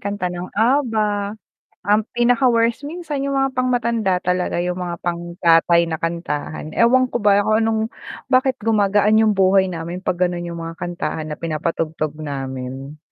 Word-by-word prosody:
kanta 200 Hz, -3 st, -3 dB
ng 175 Hz, +1 st, -6 dB
Abba. 220 Hz, -4 st, +1 dB, 0.5 s
Ang 210 Hz, +1 st, +4 dB
pinaka-worst 240 Hz, 0 st, +2 dB
minsan 300 Hz, -2 st, -4 dB
yung 275 Hz, -1 st, 0 dB
mga 270 Hz, -1 st, 0 dB
pangmatanda 235 Hz, -6 st, +1 dB
talaga 180 Hz, -1 st, -1 dB
yung 180 Hz, 0 st, -1 dB
mga 175 Hz, -1 st, -5 dB
pang-tatay 170 Hz, 0 st, +2 dB
na 160 Hz, -, -2 dB
kantahan. 155 Hz, -2 st, -4 dB
Ewan 255 Hz, +2 st, +4 dB
ko 240 Hz, -2 st, -3 dB
ba 205 Hz, -1 st, +5 dB
kung 215 Hz, +1 st, +2 dB
anong 220 Hz, -1 st, +1 dB, 0.5 s
bakit 260 Hz, 0 st, +2 dB
gumagaan 210 Hz, 0 st, +3 dB
yung 220 Hz, -1 st, +4 dB
buhay 190 Hz, 0 st, +4 dB
namin 170 Hz, +2 st, -5 dB
'pag 175 Hz, -, -1 dB
gano'n 175 Hz, -1 st, -4 dB
yung 170 Hz, -, -6 dB
mga 165 Hz, 0 st, -6 dB
kantahan 170 Hz, -3 st, -4 dB
na 150 Hz, -, -5 dB
pinapatugtog 155 Hz, -1 st, -3 dB
namin. 135 Hz, -1 st, -6 dB
190 Hz, 150 wpm, -20 LUFS, 170-230 Hz, 0.5 s, ba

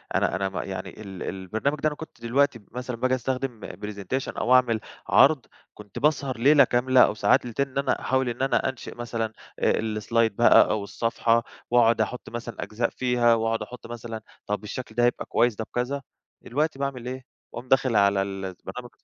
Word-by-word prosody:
أنا -, -, +2 dB
أنا 95 Hz, +1 st, -1 dB
م 95 Hz, -, -7 dB
يعني 95 Hz, -1 st, -4 dB
ال 95 Hz, -3 st, -7 dB
البرنامج 110 Hz, +10 st, -2 dB
ده 155 Hz, -, +1 dB
أنا 150 Hz, -, -2 dB
كنت 160 Hz, -7 st, -11 dB
دلوقتي 130 Hz, +1 st, +1 dB
مثلًا 125 Hz, 0 st, -5 dB
باجي 130 Hz, +2 st, +1 dB
أستخدم 130 Hz, -2 st, -3 dB
presentation 105 Hz, +6 st, -5 dB
أو 125 Hz, -, +2 dB
أعمل 120 Hz, -3 st, +4 dB, 0.3 s
عرض، -, -, +5 dB, 0.3 s
كنت 105 Hz, -2 st, -10 dB
باسهر 140 Hz, -4 st, +1 dB
ليلة 140 Hz, +4 st, +6 dB
كاملة 125 Hz, +1 st, +3 dB
أو -, -, +2 dB
ساعات 110 Hz, -, +3 dB
ليلتين 135 Hz, +4 st, -1 dB
إن 130 Hz, -, -9 dB
أنا 140 Hz, -1 st, +1 dB
أحاول 130 Hz, -1 st, +1 dB
إن 120 Hz, -, -5 dB
أنا 135 Hz, -1 st, +2 dB
أنشئ 130 Hz, -2 st, -8 dB
مثلًا 115 Hz, -2 st, -3 dB, 0.3 s
آآ، -, -, +3 dB, 0.3 s
الslide 115 Hz, +1 st, +2 dB
بقى 120 Hz, +4 st, +6 dB
أو 110 Hz, -2 st, -1 dB
الصفحة 115 Hz, +2 st, +1 dB, 0.3 s
وأقعد 115 Hz, -2 st, +4 dB
أحط 125 Hz, +3 st, -3 dB
مثلًا 120 Hz, -1 st, -6 dB
أجزاء 110 Hz, +3 st, -1 dB
فيها 125 Hz, -2 st, +2 dB
وأقعد 115 Hz, 0 st, 0 dB
أحط 115 Hz, +3 st, -8 dB
مثلًا 115 Hz, -1 st, -7 dB, 0.3 s
طب، 105 Hz, +1 st, -2 dB
الشكل 125 Hz, +4 st, -7 dB
ده 120 Hz, -, +2 dB
هيبقى 120 Hz, -, +1 dB
كويس 120 Hz, -1 st, +2 dB
طب، 110 Hz, +1 st, -5 dB
كذا 130 Hz, +3 st, -1 dB, 0.4 s
دلوقتي 145 Hz, +2 st, -1 dB
باعمل 130 Hz, -3 st, -3 dB
إيه، 130 Hz, 0 st, -5 dB, 0.3 s
باقوم 120 Hz, +2 st, -7 dB
داخل 130 Hz, -3 st, +3 dB
على 100 Hz, -1 st, +4 dB
البرنامج. 95 Hz, +5 st, -6 dB
120 Hz, 185 wpm, -25 LUFS, 110-130 Hz, 0.4 s, ليلة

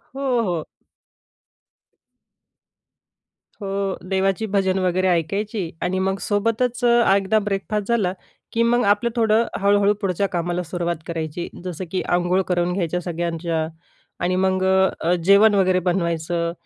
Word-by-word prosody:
हो, 260 Hz, -4 st, 0 dB
हो. 165 Hz, -3 st, -2 dB, 3.0 s
हो. 195 Hz, -1 st, -2 dB
देवाची 195 Hz, +3 st, 0 dB
भजन 190 Hz, -1 st, +2 dB
वगैरे 185 Hz, 0 st, +1 dB
ऐकायची 185 Hz, +2 st, -1 dB
आणि 185 Hz, +1 st, -1 dB
मग 190 Hz, +1 st, 0 dB
सोबतच 230 Hz, +4 st, 0 dB
एकदा 220 Hz, -3 st, +3 dB
ब्रेकफास्ट 205 Hz, 0 st, -2 dB
झाला, 210 Hz, -6 st, +1 dB, 0.4 s
की 230 Hz, 0 st, +1 dB
मग 240 Hz, +1 st, +2 dB
आपलं 205 Hz, +4 st, +2 dB
थोडं 225 Hz, 0 st, +3 dB, 0.2 s
हळू-हळू 200 Hz, 0 st, +4 dB
पुढच्या 195 Hz, +1 st, 0 dB
कामाला 175 Hz, 0 st, -2 dB
सुरुवात 170 Hz, 0 st, -2 dB
करायची. 165 Hz, 0 st, -4 dB, 0.2 s
जसं 180 Hz, 0 st, -5 dB
की 185 Hz, -, -1 dB
अंघोळ 175 Hz, +2 st, +1 dB
करून 175 Hz, -1 st, 0 dB
घ्यायच्या 180 Hz, -1 st, -1 dB
सगळ्यांच्या. 170 Hz, -1 st, -2 dB, 0.6 s
आणि 180 Hz, +1 st, +1 dB
मग 185 Hz, 0 st, +1 dB
अ, 190 Hz, 0 st, +4 dB, 0.2 s
अ, -, -, +4 dB
जेवण 200 Hz, +3 st, +6 dB
वगैरे 185 Hz, -1 st, +3 dB
बनवायचं. 170 Hz, -1 st, -1 dB
190 Hz, 125 wpm, -22 LUFS, 175-205 Hz, 3.0 s, जेवण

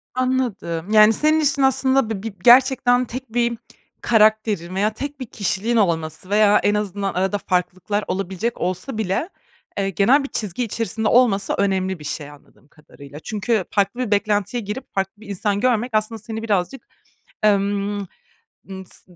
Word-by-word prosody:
Anladım. 235 Hz, -9 st, -2 dB
Yani, 215 Hz, 0 st, +7 dB
senin 310 Hz, +6 st, +3 dB
için 285 Hz, -2 st, +1 dB
aslında 265 Hz, -2 st, +2 dB
bi 205 Hz, -2 st, -4 dB
bi 225 Hz, -3 st, -5 dB
gerçekten 250 Hz, 0 st, +5 dB
tek 250 Hz, -1 st, -8 dB
bir 235 Hz, -1 st, 0 dB, 0.4 s
karakterin 215 Hz, -5 st, +2 dB
veya 210 Hz, +3 st, +1 dB
tek 285 Hz, +5 st, -6 dB
bir 255 Hz, -, -5 dB
kişiliğin 215 Hz, +1 st, -2 dB
olması 170 Hz, -3 st, 0 dB
veya 210 Hz, 0 st, +4 dB
en 205 Hz, -, +3 dB
azından 200 Hz, -1 st, -2 dB
arada 190 Hz, +3 st, 0 dB
farklılıklar 185 Hz, +3 st, -2 dB
olabilecek 195 Hz, +5 st, -3 dB
olsa 185 Hz, +7 st, -3 dB
bile, 220 Hz, -, -1 dB, 0.5 s
eee, 195 Hz, -1 st, 0 dB
genel 240 Hz, -, +3 dB
bir -, -, -4 dB
çizgi 210 Hz, +2 st, -3 dB
içerisinde 225 Hz, -1 st, -2 dB
olması 210 Hz, -6 st, +3 dB
önemli 190 Hz, -3 st, 0 dB
bir -, -, -11 dB
şey, 145 Hz, 0 st, -5 dB
anladığım 145 Hz, -1 st, -19 dB
kadarıyla. 145 Hz, -1 st, -14 dB
Çünkü 210 Hz, +1 st, -1 dB
farklı 200 Hz, +4 st, 0 dB
bir 240 Hz, -5 st, -2 dB
beklentiye 205 Hz, +3 st, 0 dB
girip 210 Hz, +6 st, -7 dB
farklı 195 Hz, 0 st, -1 dB
bir 220 Hz, -, -13 dB
insan 200 Hz, +1 st, -1 dB
görmek 245 Hz, 0 st, +1 dB
aslında 215 Hz, +1 st, -1 dB
seni 220 Hz, +1 st, -6 dB
birazcık, 215 Hz, +4 st, -2 dB, 0.6 s
emm, 205 Hz, 0 st, +1 dB, 0.7 s
ımm, 190 Hz, -1 st, -8 dB
s 180 Hz, -, -13 dB
210 Hz, 155 wpm, -21 LUFS, 195-235 Hz, 0.7 s, Yani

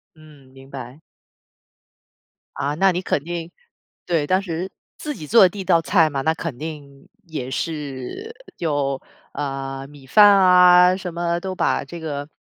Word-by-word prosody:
嗯， 150 Hz, -3 st, -18 dB
明 135 Hz, 0 st, -15 dB
白。 130 Hz, 0 st, -9 dB, 1.6 s
啊， 140 Hz, +1 st, -2 dB
那 190 Hz, +4 st, +3 dB
你 180 Hz, 0 st, -2 dB
肯 150 Hz, -6 st, -1 dB
定 170 Hz, 0 st, -5 dB, 0.5 s
对， 165 Hz, -4 st, 0 dB
当 185 Hz, +5 st, +2 dB
时 180 Hz, 0 st, -4 dB, 0.3 s
自 300 Hz, -, -5 dB
己 150 Hz, -, -9 dB
做 230 Hz, +5 st, +6 dB
的 185 Hz, -, +6 dB
第 205 Hz, -, -10 dB
1 -, -, -3 dB
道 175 Hz, -3 st, +3 dB
菜 165 Hz, -2 st, +3 dB
嘛， 140 Hz, -2 st, -3 dB
那 160 Hz, +4 st, +1 dB
肯 160 Hz, -5 st, -6 dB
定 145 Hz, -2 st, -9 dB, 0.2 s
也 130 Hz, -6 st, -5 dB
是 150 Hz, -, -5 dB, 0.2 s
有， 145 Hz, -4 st, -1 dB, 0.3 s
呃， 135 Hz, -1 st, -4 dB
米 140 Hz, -2 st, -16 dB
饭 210 Hz, +10 st, +7 dB
啊 180 Hz, -2 st, +6 dB
什 185 Hz, -3 st, -6 dB
么， 170 Hz, 0 st, -1 dB
都 190 Hz, +1 st, -5 dB
把 -, -, 0 dB
这 170 Hz, -, -9 dB
个 145 Hz, -3 st, -5 dB
160 Hz, 170 characters per minute, -21 LUFS, 140-180 Hz, 1.6 s, 饭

